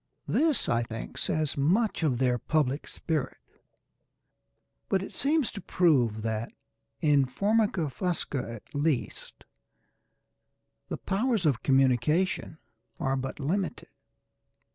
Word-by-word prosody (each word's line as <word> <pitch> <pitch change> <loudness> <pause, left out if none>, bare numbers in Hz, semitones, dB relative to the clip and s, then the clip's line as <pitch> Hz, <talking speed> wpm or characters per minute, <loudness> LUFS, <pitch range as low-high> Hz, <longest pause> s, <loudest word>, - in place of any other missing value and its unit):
This 310 -3 +2
I 120 0 +2
think 115 -1 -6
says 155 -2 0
much 190 +11 +2
for 160 - +3
their 125 -1 +1
public 145 +1 0
spirit, 155 -5 -3 1.5
but 190 -1 +1
it - - -8
seems 295 -2 +1
to 200 - -7
prove 130 - +2
that, 110 0 -2 0.5
in 145 -3 +4
F. 125 - -23
fusca 180 - 0
at 115 +6 -11
least, 145 -2 -2 1.5
the - - -3
powers 215 -1 0
of 140 -7 +2
communication 140 +6 +2 0.4
are 135 -5 0
but 135 +1 -4
limited. 180 +7 -2
150 Hz, 110 wpm, -28 LUFS, 130-190 Hz, 1.5 s, in